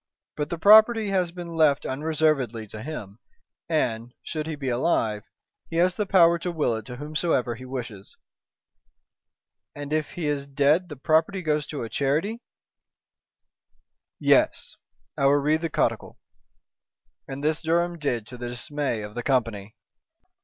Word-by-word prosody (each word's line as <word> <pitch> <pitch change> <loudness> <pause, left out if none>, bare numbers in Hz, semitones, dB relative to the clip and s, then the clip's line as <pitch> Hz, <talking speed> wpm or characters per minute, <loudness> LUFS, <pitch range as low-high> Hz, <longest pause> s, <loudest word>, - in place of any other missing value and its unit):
But 150 0 -3
the 170 - -3
property 215 +4 +6
has 185 -3 0
been 170 -1 -8
left 155 -3 +3
unreservedly 140 -5 0
to 110 - -8
him, 110 -7 -7 0.5
and, 120 -6 -1
should 155 -1 -4
he 160 - -3
be 140 -2 -6
alive, 120 -5 0 0.5
he 165 - -6
has 175 +1 +3
the 210 - -2
power 170 -3 +5
to 175 +1 -3
will 150 -8 0
it 110 -1 -7
to 125 - -7
whomsoever 150 -3 -1
he 125 +2 -10
wishes." 115 -6 -7 1.6
"And 145 +1 -5
if 155 -1 -1
he 175 - -4
is 140 -1 -2
dead 145 +6 +2
the 150 - -7
property 160 +7 +1
goes 150 -2 0
to 145 - -5
a - - -4
charity." 155 - -1 1.8
"Yes! - - +2 0.4
I 140 - +4
will 140 - +5
read 150 +2 +2
the 165 - -2
codicil!" - - -1 1.1
and 135 +1 -7
this 155 +1 +1
Durham 170 +1 0
did 120 -7 -1
to 125 - -10
the 120 0 -4
dismay 125 -2 -3
of 105 0 -8
the 120 - -4
company. 115 -6 -1
150 Hz, 155 wpm, -25 LUFS, 125-165 Hz, 1.8 s, property